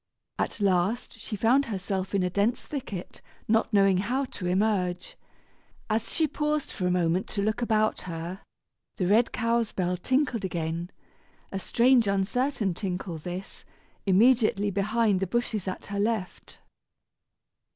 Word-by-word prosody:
At - - -2
last, 200 +4 0
she 220 0 -5
found 245 +7 +3
herself 195 -3 -3
in 195 - +2
a 180 - +1
dense 205 +6 +1
thicket, 220 - -6 0.3
not 225 +1 +2
knowing 195 -3 +4
how 250 +8 0
to 195 -8 -6
emerge. 180 -2 0 0.8
As 220 +1 0
she 320 - +2
paused 300 0 -1
for 180 - -2
a - - +2
moment 180 +1 +1
to 200 - -2
look 215 +3 0
about 215 -2 +1
her, 170 +3 -5 0.6
the 185 - 0
red 220 +6 +4
cow's 230 -1 0
bell 180 -1 -1
tinkled 255 +2 0
again 170 -1 -3 0.6
a 195 - -3
strange 240 +3 +3
uncertain 200 +2 0
tinkle 180 -2 -4
this 180 +4 -7 0.4
immediately 210 0 +4
behind 205 +1 +1
the 195 - -1
bushes 220 -2 -1
at 185 - -4
her 200 0 -4
left. 210 -3 -2
200 Hz, 140 wpm, -27 LUFS, 185-230 Hz, 0.8 s, knowing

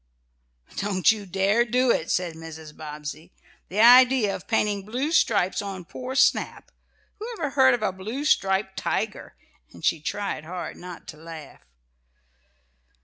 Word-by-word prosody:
"Don't 195 -3 +3
you 210 -3 -5
dare 195 +5 +2
do 250 +1 +2
it," 160 - -1
said 180 -2 0
Mrs. 160 -1 -10
Bobbsey, 150 +2 -8 0.4
"The 205 +4 0
idea 245 -3 +6
of - - -10
painting 210 -3 0
blue 250 +9 -2
stripes 205 - +2
on 195 -3 -6
poor 255 +8 -7
Snap! - - +1 0.5
Whoever 425 - -4
heard 260 -2 +5
of 225 - -6
a 215 - +1
blue 220 +10 -5
striped 190 -6 +1
tiger?" - - -3 0.4
and 85 - -9
she 160 - +2
tried 200 -1 -3
hard 175 +2 -6
not 180 0 -10
to 155 - -9
laugh. 160 -2 -11
195 Hz, 145 wpm, -25 LUFS, 170-245 Hz, 0.5 s, idea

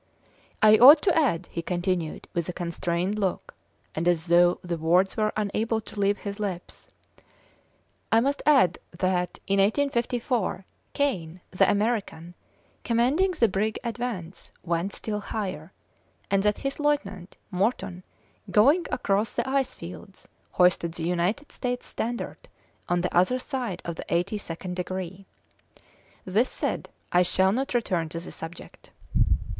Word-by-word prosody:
"I 215 0 +7
ought 285 +6 +10
to 365 - +3
add," 230 - +2
he 170 - -3
continued, 175 -1 -2
with 170 0 -2
a - - -3
constrained 175 +3 -2
look, 190 -3 -2 0.4
and 165 +2 -2
as 170 -2 +2
though 175 +1 +5
the 175 -1 -3
words 180 +4 +3
were 215 -1 +1
unable 215 +2 0
to 215 -1 -10
leave 200 +1 +2
his 200 0 -6
lips 190 -4 -5 1.2
"I 225 - +6
must 280 +4 0
add 260 - +5 0.2
that, 180 -1 0
in 195 0 +1
1854, 235 -2 0 0.3
Kane, 185 - -1
the 185 - +3
American, 205 -6 -1 0.5
commanding 265 +11 +2
the 235 -9 +3
brig 210 +2 -1
Advance, 230 -7 -5
went 170 +2 -1
still 210 -1 -3
higher, 190 -6 -5 0.6
and 195 0 +3
that 210 +1 +1
his 275 +2 -2
lieutenant, 205 -12 -1
Morton, 185 -2 -1 0.5
going 285 +12 +4
across 205 -2 0
the - - -1
ice 265 -1 0
fields, 180 +3 -11 0.3
hoisted 180 -2 +3
the 165 - -6
United 180 - -1
States 250 -1 -3
standard 235 +1 -5 0.4
on 175 0 +2
the 180 - -2
other 185 +9 +4
side 250 -8 -4
of 170 -1 -4
the - - -6
eighty 175 +5 0
second 180 0 -6
degree. 185 +1 -5 1.0
This 210 +7 +2
said, - - -3 0.2
I 175 - +5
shall 190 +1 +3
not 255 +3 -1
return 180 -9 0
to 165 - -5
the 170 - -9
subject. 165 +2 -10
195 Hz, 140 wpm, -26 LUFS, 175-235 Hz, 1.2 s, ought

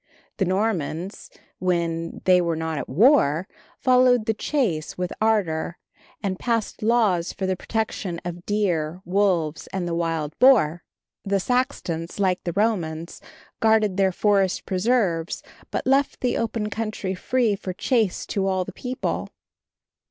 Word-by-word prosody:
The 190 - +1
Normans, 185 -2 -2 0.3
when 170 -2 -1
they 180 -1 +6
were 170 -1 0
not 160 -1 -2
at - - -6
war, 185 - +4 0.3
followed 250 -3 +4
the 220 - +1
chase 210 - -1
with 180 -1 -2
ardor, 180 -7 +1 0.5
and 190 -2 -2
passed 230 -3 -1
laws 215 -6 +2
for 190 - -4
the 185 0 0
protection 195 -4 -3
of 175 0 -6
deer, 180 -5 0
wolves 180 -5 +1
and 185 -2 -3
the 170 - -2
wild 165 -3 -1
boar. 190 - +5 0.4
The 200 0 +1
Saxons, 185 -8 -2
like 185 -2 +1
the 175 - -2
Romans, 175 -6 -1 0.4
guarded 220 -4 +3
their 190 -1 +3
forest 195 -1 +1
preserves, 190 -4 0 0.3
but - - -3
left 275 +2 +2
the 250 - +1
open 220 -2 -2
country 215 -4 -3
free 230 +3 +1
for 190 -1 -5
chase 220 +1 0
to 195 -1 -1
all 185 -1 0
the - - -8
people. 255 0 -3
190 Hz, 140 wpm, -24 LUFS, 170-220 Hz, 0.5 s, they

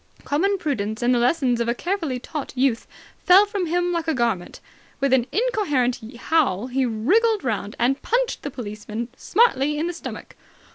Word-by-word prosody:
Common 390 +8 +1
prudence 220 - -2
and 245 +1 +3
the 245 - +2
lessons 245 -1 +2
of 235 - -1
a 235 - +1
carefully 335 -5 -2
taught 270 +1 -6
youth 250 -3 +1 0.4
fell 385 +3 +7
from 405 -4 -3
him 355 +2 0
like 335 -2 -2
a 320 - +1
garment. 230 -8 -1 0.4
With 275 -1 +1
an 250 -2 +3
incoherent 360 - 0 0.2
howl 245 - +1
he 260 0 +1
wriggled 395 - +2
round 210 -4 -2
and 260 +4 +1
punched - - 0
the - - -4
policeman 215 0 -6
smartly 300 - +2
in 310 - -1
the 350 - -2
stomach. 335 - -8
270 Hz, 175 wpm, -23 LUFS, 240-355 Hz, 0.4 s, fell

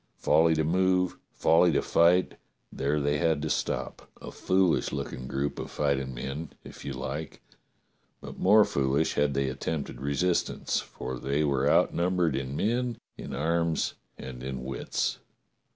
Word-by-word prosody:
Folly 80 0 +4
to 80 - +1
move, 90 +2 +2
folly 85 +2 +4
to - - +1
fight, 90 +2 +3 0.3
there 70 +2 0
they 75 0 0
had 80 -2 +2
to 75 - -1
stop - - -3
— - - -23
a - - -8
foolish 95 -2 +1
looking 65 +1 -5
group 70 +2 -2
of - - -5
fighting 70 -3 -1
men, 70 +6 -5
if - - -11
you 70 - -4
like, 65 -1 -5 0.8
but - - -10
more 105 +2 +6
foolish 70 +3 +1
had 75 -1 +1
they 70 0 +1
attempted 65 0 -4
resistance, 80 +6 0
for 65 -1 -6
they 70 +4 0
were 70 -1 +1
outnumbered 85 -3 +2
in 65 0 -3
men, 120 +6 0 0.2
in - - -8
arms, 85 +2 0 0.2
and 65 -1 -8
in 65 0 -5
wits. 65 +1 -2
75 Hz, 150 wpm, -28 LUFS, 70-85 Hz, 0.8 s, more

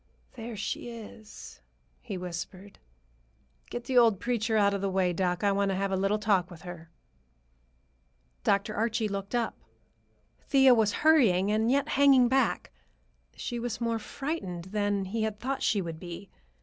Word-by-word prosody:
"There 230 -2 -7
she 215 +3 -4
is," 220 -2 -11 0.4
he 205 -6 -5
whispered. 180 +2 -7 0.9
"Get 240 - -5
the 255 0 +3
old 225 -5 +4
preacher 230 -2 0
out 200 -1 +3
of 200 - -2
the 195 - 0
way, 185 -2 +1
doc. 180 +1 -1
I 200 - +4
want 200 0 +1
to 195 - 0
have 195 +1 -1
a - - +1
little 195 +2 +1
talk 200 -5 +1
with 175 -1 -12
her." 175 -2 -9 1.5
Dr. 200 +2 +1
Archie 225 0 0
looked 200 +2 -4
up. 235 -2 -1 0.8
Thea 270 -2 +5
was 220 -3 +3
hurrying 210 - +5
and 220 +2 +2
yet 280 +3 +1
hanging 275 -4 +5
back. 265 +2 +1 0.6
She 240 -2 -4
was 235 -1 -4
more 230 -1 -1
frightened 190 - -5
than 205 -2 0
he 220 +4 -3
had 215 -1 -2
thought 270 +2 -3
she 200 -3 +1
would 165 -2 -6
be. 175 +2 -9
210 Hz, 160 wpm, -29 LUFS, 190-235 Hz, 1.5 s, Thea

